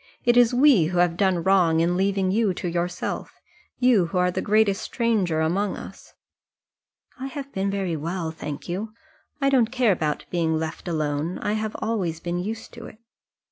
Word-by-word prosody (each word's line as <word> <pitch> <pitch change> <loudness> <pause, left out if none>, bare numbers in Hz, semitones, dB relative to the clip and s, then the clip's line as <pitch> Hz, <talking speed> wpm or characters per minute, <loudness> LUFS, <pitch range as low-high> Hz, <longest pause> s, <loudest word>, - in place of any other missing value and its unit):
It 240 - +4
is 245 -1 +6
we 250 - +5
who 175 +3 -2
have 175 -1 +3
done 185 -2 +1
wrong 180 -4 +3
in 170 +2 +2
leaving 190 0 +1
you 205 -2 +1
to 180 - -4
yourself 175 +1 -3 0.4
you 245 -9 +4
who 185 - -3
are 180 0 +2
the - - -2
greatest 210 -2 +2
stranger 205 -10 0
among 190 +5 0
us." - - -11 1.0
"I 265 - -4
have 275 0 -7
been 195 +1 -1
very 195 -4 -2
well, 165 +2 -3
thank 150 -2 -7
you. 205 +5 -4 0.5
I 275 -1 +2
don't 240 -4 +3
care 250 -4 +3
about 155 -5 -1
being 165 -2 +1
left 160 +3 -5
alone. 155 0 -1
I 205 - -2
have 215 0 -3
always 190 -8 -1
been 175 +1 -3
used 220 +5 -5
to 235 -1 -9
it." - - -13
190 Hz, 180 wpm, -24 LUFS, 170-220 Hz, 1.0 s, is